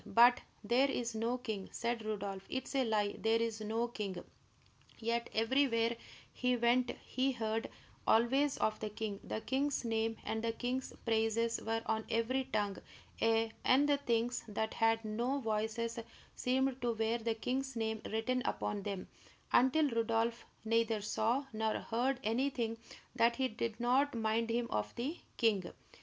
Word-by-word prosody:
"But 240 +1 +6 0.2
there 250 +6 +3
is 240 -3 -2
no 230 +3 0
king!" 220 -6 -5
cried 235 -1 -1
Rodolph. 200 -3 -3
"It 260 - -2
is - - -8
a 270 -1 +3
lie; 210 -2 +1
there 225 +1 +3
is 225 -1 -1
no 225 +2 0
king!" 210 -6 -5 0.7
Yet 235 +1 -1
everywhere 230 0 +2 0.4
he 250 0 +1
went 240 +1 +3 0.2
he 265 +1 0
heard 225 -1 -2 0.4
always 265 +5 +4
of 215 - 0
the 215 - -3
king; 210 -1 -4
the 220 - -4
king's 270 +1 0
name 225 0 0
and 220 0 -2
the 230 0 0
king's 255 +3 -2
praises 230 0 +1
were 225 +1 -1
on 220 -1 0
every 240 +3 +1
tongue; 200 -5 -1 0.4
ay, 225 0 +3
and 275 +3 +5
the 290 -1 +4
things 240 -2 0
that 220 +1 -2
had 225 0 +2
no 240 +6 0
voices 225 0 -1 0.4
seemed 265 +1 +1
to 240 -1 +1
wear 225 +1 0
the 230 0 -1
king's 265 +3 -2
name 220 -1 -1
written 250 +4 0
upon 205 - -2
them, 195 -2 -4 0.5
until 280 +5 +5
Rodolph 230 -1 0 0.2
neither 225 -1 +2
saw 225 +6 0
nor 220 0 0
heard 245 +3 0
anything 230 0 0 0.4
that 235 0 +3
did 230 -3 -2
not 255 +3 +3
mind 225 0 +1
him 235 +1 +1
of 105 0 -2
the 285 +8 -3 0.2
king. 205 -6 +2
230 Hz, 155 wpm, -35 LUFS, 220-250 Hz, 0.7 s, But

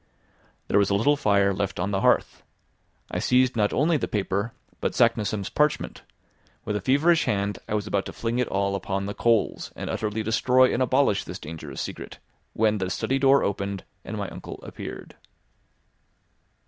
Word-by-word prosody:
There 100 - +3
was 100 - +2
a 100 - +2
little 140 +9 +3
fire 100 -7 +3
left 100 0 -3
on 100 - -1
the 95 -1 0
hearth. - - +2 0.7
I - - -1
seized 130 0 +3
not 105 -2 +2
only 155 +3 +2
the - - -2
paper 100 +2 -1 0.3
but - - -1
Saknussemm's 110 -3 +1
parchment; 150 0 0 0.6
with 105 - -2
a 105 - -1
feverish 155 - +3
hand 100 0 -1
I 105 - 0
was 105 -1 -1
about 100 -2 -1
to - - -6
fling 115 +1 -2
it 125 - +1
all 100 0 0
upon 100 0 -2
the 100 - -4
coals 115 -3 +1
and - - -4
utterly 110 0 -2
destroy 125 +4 +3
and 125 - 0
abolish 130 -5 +2
this - - -6
dangerous 80 +1 -7
secret, - - -7 0.4
when 110 -1 +2
the 95 -1 -2
study 135 +8 -1
door 135 +1 +5
opened, 100 -1 -2 0.2
and - - -6
my - - -3
uncle - - -9
appeared. - - -8
105 Hz, 175 wpm, -25 LUFS, 100-130 Hz, 0.7 s, door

